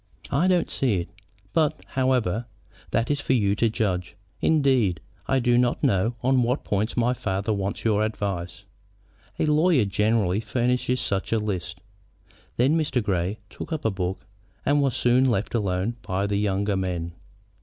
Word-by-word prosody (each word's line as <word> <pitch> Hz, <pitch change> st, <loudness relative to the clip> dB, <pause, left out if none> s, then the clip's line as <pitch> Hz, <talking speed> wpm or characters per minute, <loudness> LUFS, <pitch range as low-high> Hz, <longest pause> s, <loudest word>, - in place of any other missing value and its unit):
"I 150 Hz, +6 st, +2 dB
don't 180 Hz, -3 st, +2 dB
see 125 Hz, -6 st, +1 dB
it; 85 Hz, -, -8 dB, 0.4 s
but, 155 Hz, -3 st, +1 dB
however, 125 Hz, -5 st, 0 dB, 0.4 s
that 115 Hz, +4 st, 0 dB
is 145 Hz, 0 st, 0 dB
for 130 Hz, -, +1 dB
you 100 Hz, -5 st, +2 dB
to 115 Hz, -, +3 dB
judge. 95 Hz, -4 st, -2 dB, 0.3 s
Indeed, 130 Hz, -, +3 dB, 0.3 s
I 135 Hz, -, +2 dB
do 120 Hz, -1 st, +3 dB
not 125 Hz, -1 st, +1 dB
know 100 Hz, +5 st, +2 dB
on 130 Hz, 0 st, +3 dB
what 125 Hz, +3 st, 0 dB
points 105 Hz, +4 st, -1 dB
my 120 Hz, +1 st, +3 dB
father 100 Hz, -2 st, -2 dB
wants 100 Hz, +1 st, -3 dB
your 110 Hz, -1 st, +3 dB
advice. 100 Hz, -4 st, -3 dB, 0.7 s
A -, -, +1 dB
lawyer 150 Hz, -, +3 dB
generally 105 Hz, -1 st, +1 dB
furnishes 125 Hz, +2 st, 0 dB
such 100 Hz, -5 st, -1 dB
a 115 Hz, -, +3 dB
list." 95 Hz, -5 st, -4 dB, 0.8 s
Then 130 Hz, +6 st, +3 dB
Mr. 150 Hz, -7 st, 0 dB
Grey 95 Hz, 0 st, -1 dB
took -, -, -9 dB
up 160 Hz, -6 st, -3 dB
a 110 Hz, -, +3 dB
book, 95 Hz, -1 st, -3 dB, 0.4 s
and 145 Hz, +1 st, +3 dB
was 135 Hz, -4 st, +1 dB
soon 125 Hz, +2 st, +3 dB
left 105 Hz, -3 st, -1 dB
alone 100 Hz, +1 st, -1 dB
by 95 Hz, -1 st, -1 dB
the 100 Hz, 0 st, 0 dB
younger 100 Hz, 0 st, 0 dB
men. 90 Hz, -3 st, -2 dB
110 Hz, 165 wpm, -25 LUFS, 95-125 Hz, 0.8 s, to